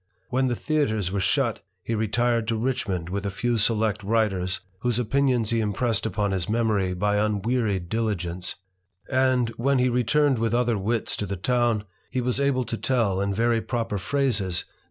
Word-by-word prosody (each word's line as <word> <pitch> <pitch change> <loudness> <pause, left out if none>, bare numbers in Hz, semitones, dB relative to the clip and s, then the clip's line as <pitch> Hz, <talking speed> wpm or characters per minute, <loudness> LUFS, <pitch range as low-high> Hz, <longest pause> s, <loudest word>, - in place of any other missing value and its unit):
When 130 +1 +1
the 120 - 0
theatre 145 -7 0
were 100 - 0
shut, 115 +3 +1 0.2
he 115 - -2
retired 115 +1 +1
to 115 - +1
Richmond 110 -8 -2
with 100 +2 -3
a 100 - -1
few 115 +4 -1
select 110 -1 +1
writers, 95 -4 0 0.2
whose 120 0 0
opinions 125 -1 +1
he 115 - +2
impressed 110 +1 0
upon 100 -1 -1
his 95 -2 -2
memory 105 -5 +1
by 105 +2 +1
un 105 -2 0
wearied 110 -7 0
diligence; 90 -5 -2 0.6
and, 130 -2 +3
when 135 +3 +2
he 125 0 +3
returned 125 +2 +2
with 115 0 +1
other 120 -1 +2
wits 110 +3 -1
to 105 - -3
the 100 +1 -3
town, 120 +1 +1 0.4
was 125 +1 0
able 140 -2 +2
to 115 0 -4
tell, 110 -8 +1
in 100 0 0
very 115 +3 +2
proper 115 -4 -2
phrases, 135 +4 +1
that 100 - -2
* - - -3 0.2
Note - - -33
XXXil. - - -36
115 Hz, 190 wpm, -25 LUFS, 100-125 Hz, 0.6 s, and